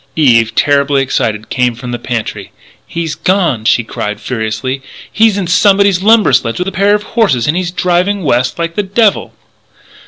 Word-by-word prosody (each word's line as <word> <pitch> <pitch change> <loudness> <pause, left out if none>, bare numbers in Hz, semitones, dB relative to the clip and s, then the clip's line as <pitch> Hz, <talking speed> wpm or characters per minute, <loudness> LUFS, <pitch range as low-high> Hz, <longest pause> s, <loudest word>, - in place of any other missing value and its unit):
Eve, 115 -7 +3
terribly 140 -1 +2
excited, 110 -4 -2
came 125 -2 0
from 125 +1 -7
the 120 - -4
pantry: 120 -2 -5 0.4
"He's 165 -2 -4
gone!" 175 - 0
she 120 +1 +2
cried 105 -2 -5
furiously. 120 +3 -4 0.3
"He's 220 -2 +2
in 195 - -2
somebody's 195 +1 +3
lumber 220 +1 +4
sledge 115 -1 +1
with 180 - -3
a - - -2
pair 200 +2 +2
of 210 - -3
horses 195 - 0
and 150 - +1
he's 180 -1 -1
driving 180 +2 0
west 125 -3 0
like 165 0 -3
the 205 - -1
devil!" 205 +2 0
160 Hz, 175 wpm, -13 LUFS, 120-195 Hz, 0.4 s, lumber